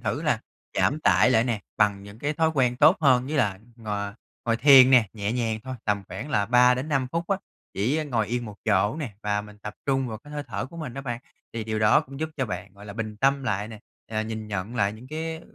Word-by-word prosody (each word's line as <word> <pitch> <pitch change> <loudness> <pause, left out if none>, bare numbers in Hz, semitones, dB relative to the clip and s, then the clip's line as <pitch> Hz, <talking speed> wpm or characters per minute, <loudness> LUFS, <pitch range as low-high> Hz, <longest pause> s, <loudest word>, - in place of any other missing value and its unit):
thử - - -2
là - - +1 0.3
giảm 150 - +1
tải 125 - +4
lại 115 -2 +4
nè, 115 -4 -1 0.2
bằng 105 -2 +2
những 100 +2 -12
cái 145 +3 -1
thói 160 +1 +2
quen 125 -3 +2
tốt 160 +8 +6
hơn 130 -4 +4
như 150 +2 -2
là 100 -7 +1 0.2
ngồi 105 -3 -4 0.3
ngồi 115 0 +2
thiền 130 0 +8
nè, 120 -6 +6
nhẹ 105 -1 -2
nhàng, 115 -3 -1
thôi 130 0 -5
tầm 100 -1 0
khoảng 115 +11 -6
là 105 -7 +1
3-5 125 +3 +3
phút 170 0 -2
á, 195 - +2 0.4
chỉ 120 +10 +1
á 155 - -1
ngồi 115 -6 0
yên 120 +3 -2
một 105 -2 -9
chỗ 105 +3 +2
nè 135 -10 -5
và 105 0 0
mình 105 0 -13
tập 105 0 -7
trung 135 -2 +1
vào 110 -1 -5
cái 145 +4 -14
hơi 145 0 -3
thở 110 +2 -4
của 170 - -13
mình 150 -7 -6
đó 135 - -4
bạn. 120 -2 -4 0.3
Thì 115 -2 -4
điều 110 -1 -2
đó 110 +7 +5
cũng 135 -1 -10
giúp 160 - -1
cho 130 -3 -1
bạn, 90 0 -6
gọi 100 +1 -13
là, 100 - -7
bình 110 -1 -5
tâm 135 +3 +2
lại 105 -1 -1
nè, 110 -2 -9 0.3
ờ, 110 0 -1
nhìn 110 -1 -5
nhận 100 +3 -4
lại 100 -3 +2
những 115 +4 -12
cái 160 +1 -4
115 Hz, 255 wpm, -26 LUFS, 105-135 Hz, 0.4 s, thiền